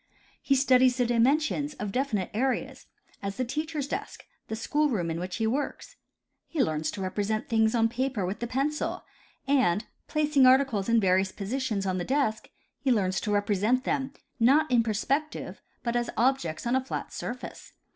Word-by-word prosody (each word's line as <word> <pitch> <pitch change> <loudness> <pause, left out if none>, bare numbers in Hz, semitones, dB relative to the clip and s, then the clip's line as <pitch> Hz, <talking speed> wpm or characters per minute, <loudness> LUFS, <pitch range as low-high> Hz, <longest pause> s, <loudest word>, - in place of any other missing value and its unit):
He 275 - +2
studies 255 -1 +4
the 250 - +2
dimensions 285 +5 +1
of 210 -1 -4
definite 225 -6 -1
areas, 260 +4 -2 0.3
as 200 0 -4
the 255 - 0
teacher's 305 +2 -3
desk, 400 +7 -5 0.2
the 220 - -3
school 295 +6 +1
room 175 -9 -1
in 165 - -3
which 180 +1 -4
he 225 - -1
works. 265 +6 -3 0.5
He 310 -5 +1
learns 155 -5 -1
to 195 - -5
represent 205 +3 -2
things 220 0 +2
on 225 -1 +4
paper 245 -3 -2
with 190 +3 -4
the 235 - -3
pencil, 275 +5 -2 0.4
and, 240 -8 +2 0.2
placing 300 -3 +3
articles 255 -6 +3
in 230 0 +5
various 190 -1 +2
positions 215 0 -2
on 185 -1 -1
the - - -2
desk, 255 -3 0 0.3
he 270 - +1
learns 190 -5 +1
to 210 - -2
represent 205 +4 +1
them, 270 -1 -1 0.3
not 275 +5 +4
in 240 -2 +5
per 225 -1 -1
spective, 280 +8 -2 0.3
but 235 0 -1
as 240 0 0
objects 240 -11 +1
on 240 +2 +1
a 260 - +1
flat 260 - -5
surface. 250 +1 -7
240 Hz, 175 wpm, -28 LUFS, 205-270 Hz, 0.5 s, in